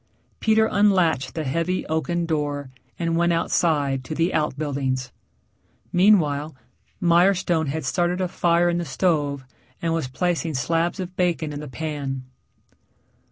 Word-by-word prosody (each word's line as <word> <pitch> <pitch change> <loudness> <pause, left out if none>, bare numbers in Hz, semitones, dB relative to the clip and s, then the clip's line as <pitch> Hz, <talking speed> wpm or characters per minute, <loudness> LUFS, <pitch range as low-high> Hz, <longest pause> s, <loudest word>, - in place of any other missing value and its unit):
Peter 220 0 +3
unlatched 185 -10 +2
the 160 - -2
heavy 165 +6 -1
oaken 170 +2 -1
door 145 -4 -2 0.3
and 165 -1 -1
went 170 +1 +2
outside 150 -5 +1
to 140 +5 -5
the 165 +3 +1
outbuildings. 140 -4 -1 0.8
Meanwhile, 160 -6 +3 0.4
Mirestone 175 -2 +3
had 150 +1 -3
started 175 +6 0
a 185 - 0
fire 175 0 +2
in 175 0 +1
the - - -2
stove 145 -2 0 0.3
and 165 -1 -1
was 165 -5 -1
placing 165 +3 -1
slabs 165 +8 0
of 185 0 -5
bacon 170 -4 0
in 145 - -5
the 150 - -7
pan. 140 -2 -4
165 Hz, 135 wpm, -23 LUFS, 145-175 Hz, 0.8 s, Peter